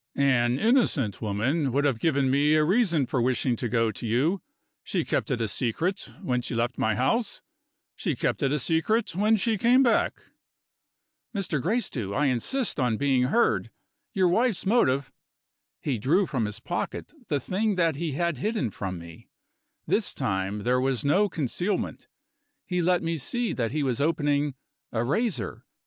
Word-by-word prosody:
An 130 Hz, -3 st, +2 dB
innocent 160 Hz, -, +2 dB
woman 125 Hz, +8 st, 0 dB
would 140 Hz, +3 st, +1 dB
have 135 Hz, -6 st, +1 dB
given 140 Hz, -2 st, +2 dB
me 145 Hz, +3 st, +3 dB
a 155 Hz, -, +4 dB
reason 170 Hz, -, +2 dB
for 125 Hz, 0 st, -1 dB
wishing 125 Hz, 0 st, +1 dB
to 120 Hz, -, -3 dB
go 115 Hz, -1 st, +1 dB
to 115 Hz, -, -6 dB
you 145 Hz, -, +1 dB, 0.4 s
she -, -, -2 dB
kept -, -, -1 dB
it 125 Hz, -, 0 dB
a 115 Hz, -, 0 dB
secret, 135 Hz, -, -2 dB
when 125 Hz, -8 st, 0 dB
she 120 Hz, -, -4 dB
left 120 Hz, +1 st, -1 dB
my 110 Hz, -1 st, +1 dB
house; 205 Hz, -, 0 dB, 0.5 s
she 165 Hz, -8 st, -2 dB
kept -, -, -1 dB
it 135 Hz, -2 st, +1 dB
a 150 Hz, -, +2 dB
secret 165 Hz, -, 0 dB
when 210 Hz, +4 st, +3 dB
she 220 Hz, 0 st, 0 dB
came 250 Hz, +5 st, +5 dB
back." 235 Hz, -4 st, +2 dB, 1.2 s
"Mr. 180 Hz, -8 st, -1 dB
Gracedieu, 155 Hz, -, -1 dB
I 150 Hz, -, +2 dB
insist 150 Hz, -, 0 dB
on 125 Hz, -4 st, +1 dB
being 135 Hz, -2 st, +2 dB
heard! 235 Hz, -, +2 dB, 0.4 s
Your 190 Hz, -5 st, +2 dB
wife's 220 Hz, +3 st, +1 dB
motive 140 Hz, -, +2 dB, 0.4 s
" -, -, -64 dB
He 130 Hz, -6 st, -1 dB
drew 165 Hz, -, +2 dB
from 125 Hz, -9 st, -1 dB
his 105 Hz, +1 st, -5 dB
pocket 175 Hz, -, -4 dB
the 145 Hz, -, 0 dB
thing 200 Hz, -, -1 dB
that 165 Hz, -4 st, +2 dB
he 160 Hz, -2 st, -2 dB
had 170 Hz, -2 st, -1 dB
hidden 210 Hz, -, -1 dB
from 95 Hz, -2 st, -5 dB
me. 85 Hz, -1 st, -12 dB, 0.6 s
This -, -, 0 dB
time, 95 Hz, +2 st, -2 dB
there 125 Hz, +1 st, +2 dB
was 135 Hz, +1 st, 0 dB
no 195 Hz, +8 st, +3 dB
concealment; 175 Hz, -, -2 dB, 0.6 s
he 180 Hz, -1 st, -1 dB
let 180 Hz, +1 st, +2 dB
me 165 Hz, -1 st, -1 dB
see 240 Hz, -, -1 dB
that 115 Hz, -3 st, -1 dB
he 150 Hz, +1 st, -1 dB
was 130 Hz, -1 st, 0 dB
opening 145 Hz, -2 st, +1 dB, 0.4 s
a 115 Hz, 0 st, 0 dB
razor. 215 Hz, -, -2 dB
145 Hz, 170 wpm, -26 LUFS, 125-185 Hz, 1.2 s, came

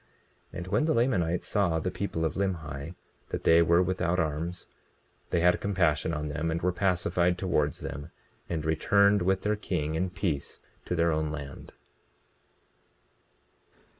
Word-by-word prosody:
20:26 -, -, -8 dB
And 90 Hz, 0 st, -5 dB
when 150 Hz, -, +2 dB
the 160 Hz, -, +2 dB
Lamanites 90 Hz, -9 st, +1 dB
saw 95 Hz, -5 st, +1 dB
the 90 Hz, +3 st, -2 dB
people 80 Hz, -5 st, -2 dB
of 80 Hz, -, 0 dB
Limhi, 85 Hz, -5 st, -3 dB, 0.3 s
that -, -, -4 dB
they 85 Hz, +1 st, +6 dB
were 85 Hz, +2 st, +4 dB
without 90 Hz, -1 st, 0 dB
arms, 80 Hz, +3 st, -2 dB, 0.6 s
they 85 Hz, -, +1 dB
had 90 Hz, +1 st, +3 dB
compassion 85 Hz, -6 st, +1 dB
on 75 Hz, -1 st, -3 dB
them 80 Hz, +3 st, -2 dB
and 80 Hz, +1 st, -1 dB
were 90 Hz, -, +3 dB
pacified 90 Hz, -1 st, +1 dB
towards 75 Hz, -6 st, 0 dB
them, 70 Hz, +3 st, -6 dB, 0.4 s
and 80 Hz, -2 st, -2 dB
returned 100 Hz, +5 st, +3 dB
with 95 Hz, +1 st, +1 dB
their 105 Hz, +1 st, +1 dB
king 85 Hz, -7 st, -2 dB
in 90 Hz, +3 st, 0 dB
peace 85 Hz, -6 st, -3 dB, 0.3 s
to 90 Hz, -, -2 dB
their 85 Hz, 0 st, +2 dB
own 80 Hz, 0 st, 0 dB
land. 70 Hz, -2 st, -8 dB
85 Hz, 155 wpm, -28 LUFS, 80-95 Hz, 0.6 s, they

